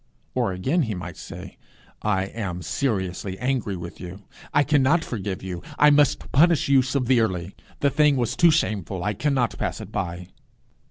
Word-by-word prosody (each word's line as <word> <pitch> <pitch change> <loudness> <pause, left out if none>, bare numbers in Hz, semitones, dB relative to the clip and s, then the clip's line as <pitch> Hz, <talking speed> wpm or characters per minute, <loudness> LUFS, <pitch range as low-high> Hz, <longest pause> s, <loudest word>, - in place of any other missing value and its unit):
Or, - - 0
again, 130 - 0
he 110 -8 -2
might 85 -2 -7
say - - -10 0.4
'I 95 -3 +1
am 95 -3 -5
seriously 95 - -2
angry 125 -5 -1
with 85 0 -8
you. 90 +3 -9 0.3
I 145 - +4
cannot 150 +3 +3
forgive 100 -5 -4
you. 90 -2 -5 0.2
I 150 0 +6
must 145 -1 +2
punish 165 +2 +4
you 135 -1 +5
severely. 120 -9 0 0.3
The 140 - +3
thing 150 -1 +4
was 120 -3 -1
too 170 - +6
shameful! 100 - 0
I 105 - 0
cannot 130 0 0
pass - - -2
it - - -9
by.' 90 +1 -4
110 Hz, 165 wpm, -24 LUFS, 95-140 Hz, 0.4 s, I